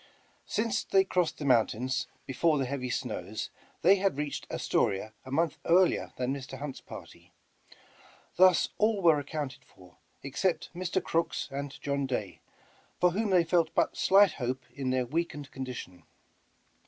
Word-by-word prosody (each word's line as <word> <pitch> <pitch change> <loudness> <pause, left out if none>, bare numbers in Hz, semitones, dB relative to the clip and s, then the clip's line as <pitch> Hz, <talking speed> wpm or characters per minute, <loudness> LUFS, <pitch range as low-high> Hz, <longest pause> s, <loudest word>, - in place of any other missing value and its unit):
Since 220 0 0
they 195 0 +4
crossed 180 -3 0
the 145 - -5
mountains 125 0 +2 0.2
before 150 +4 +2
the 135 - 0
heav>' 130 -1 -3
snows, - - -4 0.3
they 195 +3 +7
had 195 -6 0
reached 145 -2 -3
Astoria 105 +3 0
a - - -9
month 160 +2 0
earlier 180 +2 +3
than 130 +1 -1
Mr. 135 -1 -7
Hunt's 140 0 -6
party. - - -12 1.0
Thus 185 -1 +5
all 215 -2 +2
were 160 -3 +6
accounted 145 -2 -5
for, 90 -1 -19 0.3
ex 135 -1 -6
cept 185 -3 0
Mr. 185 +1 -1
Crooks 165 -2 -1
and 140 0 -5
John 140 -1 -1
Day, 100 -10 -4 0.6
for 180 - +4
whom 210 +4 -1
they 180 -3 +5
felt 165 0 +1
but - - +2
slight 195 -1 +5
hope 130 -1 -3
in 135 -1 -3
their 130 -1 +1
weakened 150 0 -3
condition. 125 -9 -7
145 Hz, 155 wpm, -29 LUFS, 130-180 Hz, 1.0 s, they